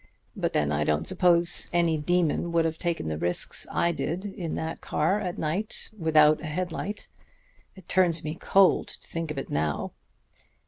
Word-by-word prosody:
But - - -2
then 75 -1 +1
I 75 +1 +1
don't 75 +1 0
suppose 175 -1 +3
any 170 -2 +2
demon 170 +1 0
would 165 -1 +3
have 160 0 -2
taken 170 - -2
the 80 -1 -3
risks 85 +1 +1
I 170 - +1
did 170 +3 -3
in 190 -5 -5
that 160 +1 -4
car 165 +7 0
at 180 -3 -4
night, 170 +7 -3
without 155 -4 +4
a 165 - -5
head 175 +3 -3
light. 205 +5 -5 0.7
It 190 -3 -15
turns 175 -3 +3
me 155 - -3
cold 195 +3 +3
to - - -9
think 165 -1 -4
of 150 - -5
it 135 - -5
now. 75 -1 -1
165 Hz, 180 wpm, -27 LUFS, 150-175 Hz, 0.7 s, without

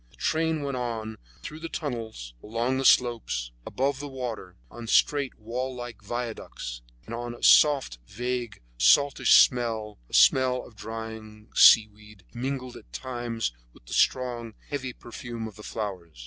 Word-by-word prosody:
The - - -23
train 160 -1 0
went 140 -2 -3
on 115 -3 -4 0.2
through 155 - -7
the 165 0 -6
tunnels, 115 - -5
along 120 +4 -1
the 135 - -2
slopes, 115 - +2 0.2
above 135 +1 -1
the 145 - -5
water, 125 -9 -6 0.2
on 120 -1 -9
straight, 140 +3 +2
wall 125 +4 -4
like 120 -3 -8
viaducts, 110 - -5 0.2
and 120 +1 -5
a - - -16
soft, 140 - +5
vague, 120 -1 -4 0.2
saltish 140 - +5
smell, 115 -4 +2
a - - -3
smell 130 -1 +4
of 115 - -16
drying 110 0 -8
seaweed, 105 -2 +5
mingled 130 0 -4
at - - -16
times 115 - -3 0.2
with - - -21
the - - -9
strong, 120 -3 0
heavy 130 -3 -3
perfume 120 -1 -7
of 110 - -11
the 105 - -12
flowers. 95 - -6
120 Hz, 150 wpm, -27 LUFS, 110-130 Hz, 0.2 s, soft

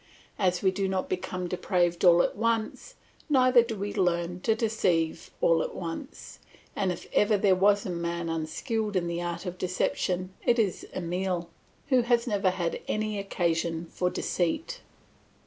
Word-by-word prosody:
As 180 -2 +1
we 190 - +4
do 195 +1 -1
not 190 -1 -2
become 180 0 -3
depraved 175 -1 0
all 175 -1 +7
at - - -1
once, 230 - -1 0.3
neither 255 -3 +6
do 230 -1 -4
we 200 +1 -3
learn 175 -2 0
to 220 +4 +1
deceive 180 -8 0
all 165 -1 +4
at - - -4
once; 180 - -7 0.4
and 190 -2 0
if 175 - -6
ever 210 0 +4
there 195 -1 +4
was 200 +2 +3
a 185 - -2
man 170 0 -3
unskilled 205 +7 -2
in 180 -2 +1
the 170 0 -2
art 175 +1 -4
of 180 0 -5
deception 185 0 -1
it 240 - +3
is 210 -5 0
Emile, 180 0 -2 0.4
who 260 -3 +5
has 235 0 +2
never 205 -5 +1
had 175 -2 -2
any 215 -1 -1
occasion 170 -3 -1
for 180 - 0
deceit. 315 - -2
185 Hz, 165 wpm, -28 LUFS, 175-215 Hz, 0.4 s, all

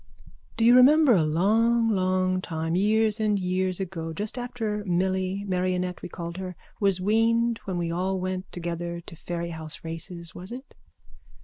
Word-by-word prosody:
_ - - -25
Do 225 - +2
you 240 +1 +7
remember 280 +2 +7
a 185 - +4
long 220 +9 +3
long 185 -2 +1
time, 165 -1 -2
years 215 +3 +2
and 210 -1 +2
years 185 0 -1
ago, 170 -4 -4
just 210 - -4
after 230 -4 -3
Milly, 190 +1 0
Marionette 180 -1 -1
we - - -7
called 170 0 -6
her, 185 -1 -5 0.2
was 195 -3 +2
weaned 230 +3 +2
when 190 -2 -3
we 170 -1 -1
all 185 +2 -1
went 185 0 -4
together 170 0 -4
to 165 - -11
Fairyhouse 170 -2 -6
races, 170 +1 -7
was 185 +4 -9
it? 260 +3 -9
185 Hz, 165 wpm, -26 LUFS, 175-215 Hz, 0.2 s, you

